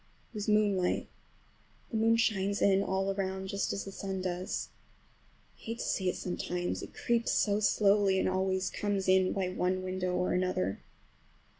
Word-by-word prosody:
It - - -35
was 210 -2 -4
moonlight. 205 -4 +2 0.8
The 225 - -1
moon 225 +1 +4
shines 200 -3 +1
in 195 -1 +4
all 195 0 0
around, 190 -1 -3
just 200 +1 -1
as 195 - -3
the 195 - -7
sun 190 -1 -4
does. 180 0 -3 0.9
I - - -25
hate 230 +1 -5
to - - -4
see 185 -2 0
it - - -2
sometimes, 175 0 -3
it - - -10
creeps 235 -1 +1
so 205 -1 +2
slowly, 200 -2 +3
and - - +1
always 190 0 0
comes 200 -2 -1
in 185 0 +4
by 190 -2 -1
one 185 0 -1
window 185 -1 -2
or 180 0 0
another. 180 - 0
190 Hz, 170 wpm, -31 LUFS, 185-205 Hz, 0.9 s, moon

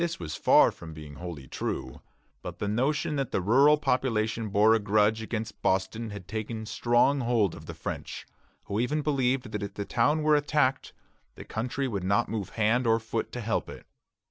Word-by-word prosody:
This 170 -1 -1
was 75 -3 -5
far - - +5
from 80 -1 -11
being 75 -2 -10
wholly 85 -6 -7
true; - - -4 0.4
but - - -7
the 105 - -3
notion 140 +7 0
that 135 -3 -1
the - - +1
rural 135 +10 +5
population 115 -5 0
bore 105 +2 +5
a 115 - +3
grudge 105 +1 +2
against 110 -2 -5
Boston 95 +4 0
had 100 -3 -9
taken 110 +1 -4
strong 120 +6 +2
hold 115 -7 +1
of - - -11
the - - -7
French, - - -6 0.4
who 100 - -3
even 145 +5 0
believed 130 -4 0
that 105 - -3
if 100 - -6
the 100 - -4
town 145 +9 +1
were 155 0 +4
attacked, 145 -2 +1 0.4
the - - -10
country 125 +4 -2
would 100 -6 -3
not 100 +2 +1
move 105 -3 -3
hand 115 +3 +2
or 115 0 +4
foot 110 0 -4
to 125 - -4
help 115 0 -1
it. - - -10
110 Hz, 195 wpm, -28 LUFS, 105-130 Hz, 0.4 s, far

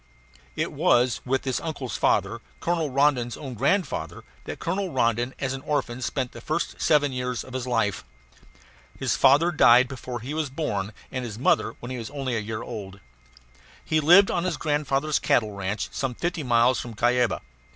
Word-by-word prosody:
It - - -1
was 120 0 +2
with 130 +1 0
this 130 -2 -1
uncle's 145 -6 -5
father, - - +1 0.2
Colonel 165 -3 0
Rondon's 130 -3 +1
own 135 -4 -7
grandfather, 165 - -1 0.2
that - - -6
Colonel 185 +3 -2
Rondon 120 -1 0
as 135 -1 -2
an 135 - -6
orphan 130 -4 -2
spent 130 0 -2
the - - -11
first - - -3
seven 145 -2 +3
years 125 -1 -3
of 130 - -12
his 130 -1 -3
life. 115 -5 0 0.9
His - - 0
father 145 +6 +5
died 125 -5 +6
before 125 -2 -6
he 135 +6 -5
was 155 -2 -2
born, 110 -9 -3 0.2
and 130 -1 -3
his 110 -3 -6
mother 125 - +1
when 120 - -6
he 125 - -4
was 115 - -6
only 135 -4 -3
a - - 0
year 110 +1 -5
old. 100 -4 -8 0.9
He 155 - +2
lived 175 +6 +6
on 175 - 0
his 180 -4 -1
grandfather's 150 -1 0
cattle 110 -3 +2
ranch, 100 +1 -3
some 130 -3 -3
fifty 175 +2 -2
miles 120 -1 +3
from 120 -2 -7
Cuyaba. 120 +1 +1
130 Hz, 180 wpm, -25 LUFS, 120-150 Hz, 0.9 s, died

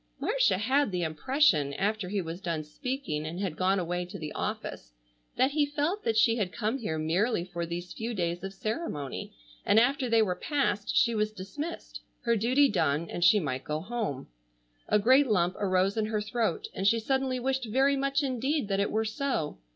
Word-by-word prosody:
Marcia - - +2
had 265 +7 +2
the 180 -1 -1
impression, 160 - +2
after 205 0 -1
he 200 -1 -1
was 165 +3 -6
done 165 -4 -2
speaking 245 - -4
and 160 +3 -5
had 190 -6 -2
gone 190 +3 +2
away 175 0 -1
to 175 - -8
the 155 -1 -6
office, - - -5 0.4
that 260 +2 +3
he 300 +1 +2
felt 295 +8 -1
that 225 - 0
she 225 +1 +4
had 195 -5 -1
come 225 +6 -2
here 160 -9 -3
merely 175 +5 0
for 170 -2 -4
these 175 +1 -5
few 225 +2 -4
days 175 -1 -2
of 195 - -4
ceremony 195 - -4 0.3
and 215 - +5
after 260 +1 +2
they 230 -1 +5
were 185 -4 0
passed 240 -8 -1
she 235 - +4
was 215 -1 0
dismissed, 250 - -7 0.2
her 235 -1 +2
duty 255 +6 +4
done, 160 - 0
and 175 - -2
she 190 +5 +6
might 135 -6 -3
go 150 0 -2
home. 200 - -3 0.6
A - - +4
great 260 +7 +5
lump 180 -5 +2
arose 190 0 +2
in 220 -1 0
her 215 -1 -1
throat 225 - -1
and 195 - -1
she 230 +2 +4
suddenly 265 +2 0
wished 265 0 -1
very 265 +5 +2
much 275 +1 0
indeed 265 -1 -1
that 195 0 +1
it 200 - +1
were 220 +1 0
so. 220 - -2
210 Hz, 195 wpm, -29 LUFS, 175-260 Hz, 0.6 s, she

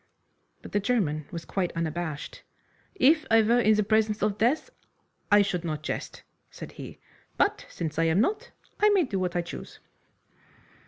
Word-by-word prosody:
But - - -10
the 205 - +1
German 185 - 0
was 170 -2 -6
quite 185 -3 -2
unabashed. 165 -2 -4 0.5
"If 310 -1 +4
I 225 -1 +5
were 235 +3 +3
in 215 -2 +4
the 210 - +2
presence 215 0 +1
of 210 -1 +1
death 275 - +1 0.6
I 205 0 +7
should 180 -3 -2
not 155 -3 -4
jest," - - -5 0.3
said - - -10
he, - - -10 0.4
"but - - +1
since 160 -2 -4
I 165 - +3
am 165 +3 +2
not 425 - 0 0.3
I 420 - +5
may 400 -3 +4
do 210 -9 -2
what 180 -1 -2
I 175 - +1
choose." 170 - -9
205 Hz, 170 wpm, -27 LUFS, 170-235 Hz, 0.6 s, I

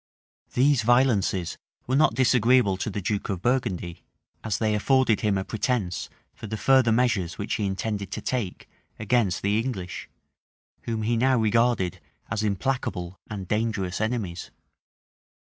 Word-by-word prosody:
[*] - - -38
These 135 0 +4
violences 110 -8 +2 0.3
were 130 - 0
not 145 -5 +4
disagreeable 125 -4 +4
to 95 - -3
the 100 -1 -4
duke 105 +3 -2
of 95 -3 -3
Burgundy; 95 -9 -1 0.4
as 110 -4 -1
they 110 -1 +1
afforded 125 +1 +2
him 105 -2 +1
a 95 - -3
pretence 110 -6 -2 0.2
for - - -9
the 110 +1 -4
further 130 -1 +4
measures 110 -7 +1
which 100 - -3
he 105 -3 0
intended 100 0 -3
to - - -3
take 115 -8 -3 0.3
against 105 -4 +1
the 100 +2 +2
English, 110 -7 -5 0.8
whom 110 -2 -2
he 115 +2 +1
now 130 +2 +3
regarded 115 -4 +1 0.3
as 110 0 0
implacable 100 -4 -2
and 100 -3 -6
dangerous 105 -3 -1
enemies. 110 -7 -3
110 Hz, 145 wpm, -25 LUFS, 95-120 Hz, 0.8 s, These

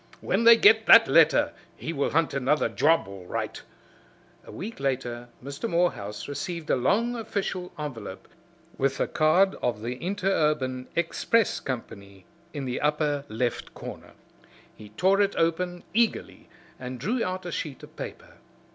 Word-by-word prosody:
"When 230 - 0
they 230 0 +9
get 415 - +5
that - - +9
letter - - +4 0.2
he 165 - -5
will 140 -2 0
hunt 165 -1 +1
another 140 +2 +1
job, 160 -4 +2
all 95 -2 -10
right!" - - -4 0.8
A - - -12
week 225 +4 -7
later 125 -3 -3
Mr. 140 - -5
Morehouse 135 - -1
received 160 +3 -4
a - - +4
long 215 - +1
official 200 -5 -4
envelope 115 -11 -7 0.5
with 135 0 +1
the - - 0
card 175 +5 +3
of 110 -3 -2
the 125 +2 -4
Interurban 150 -9 0
Express 185 +6 +1
Company 100 -7 -7 0.3
in 145 -4 -5
the 125 -1 -3
upper 150 -1 0
left 115 +2 -3
corner. - - -9 0.6
He 105 -1 -13
tore 190 - +2
it 200 0 +1
open 175 +2 0
eagerly 230 +1 -1 0.3
and 125 0 -6
drew 230 - -1
out 185 0 -4
a 175 - -4
sheet 145 -6 -5
of - - -13
paper. - - -9
150 Hz, 150 wpm, -26 LUFS, 125-185 Hz, 0.8 s, they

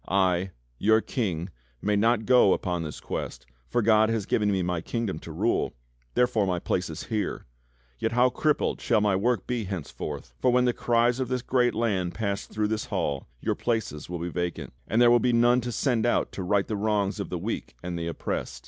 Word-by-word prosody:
^ - - -39
I, 95 -1 +2 0.3
your 110 +1 +5
King, 95 - -2 0.3
may 105 0 +1
not 110 +1 +2
go 125 -6 +6
upon 90 -2 -2
this 75 -2 -6
Quest, - - -5 0.2
for 120 - +1
God 110 0 +5
has 115 -3 -1
given 105 0 +1
me 95 -2 +1
my 90 -1 -1
kingdom 110 -5 -3
to - - -9
rule, - - 0 0.4
therefore 115 -5 +2
my 90 -1 0
place 90 +1 -1
is 80 +2 -6
here. 110 -3 -3 0.5
Yet - - -1
how 125 +1 +4
crippled 150 +2 0
shall 115 -5 +3
my 105 -2 +2
work 110 +1 +1
be 120 -3 -2
henceforth; 80 -8 -6
for 125 - +3
when 125 0 +3
the 125 - +2
cries 120 +1 +2
of 130 - -1
this 125 -1 -2
great 125 -1 +2
land 100 -6 0
pass 100 -2 -2
through 105 -1 -1
this 110 0 -1
hall, 70 -2 -2
your - - 0
places 110 -12 -2
will 90 - -3
be 85 +1 -4
vacant, 85 -5 -4
and 110 - +1
there 120 -1 +7
will 120 - +6
be 125 0 +2
none 120 +1 +4
to 120 +1 -4
send 120 0 +1
out - - +1
to - - -6
right 95 +2 +1
the 110 - -2
wrongs 105 -1 0
of 100 - -4
the 90 - -2
weak 100 - -4
and 90 -1 -4
the 85 0 -3
oppressed. 85 - -4
105 Hz, 215 wpm, -27 LUFS, 90-120 Hz, 0.5 s, there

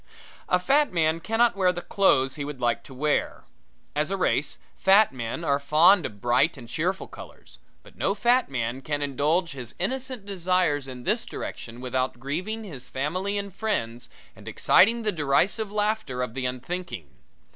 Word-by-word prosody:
A 180 - +4
fat 275 +10 +2
man 160 -2 +1
cannot 225 +5 +2
wear 185 -2 +3
the 175 -1 -6
clothes 135 -10 +3
he 145 - -4
would 145 -2 -6
like 120 -1 +1
to 135 - -11
wear. 150 +3 0 0.5
As 150 +2 0
a 195 - -1
race 150 -5 0 0.2
fat 195 -2 +5
men 120 +6 -4
are 140 -3 +2
fond 155 +6 +5
of 105 - -14
bright 125 +8 +2
and 120 -3 -10
cheerful 175 - -2
colors; - - -13 0.2
but - - -17
no 195 - 0
fat 240 +4 +3
man 125 0 -3
can 145 +1 -2
indulge 150 +5 0
his 125 -4 -7
innocent 255 +2 -3
desires 180 -7 0
in 125 -2 -8
this - - +1
direction 115 +2 -7
without 130 -1 -2
grieving 185 - -3
his 135 - -9
family 185 +9 -2
and 200 -1 -4
friends 120 - -3 0.3
and - - -15
exciting 230 +4 +4
the 215 - +1
derisive 185 +7 +1
laughter 210 - -1
of 125 - -5
the 130 0 -2
unthinking. 130 - -5
160 Hz, 170 wpm, -26 LUFS, 130-200 Hz, 0.5 s, fat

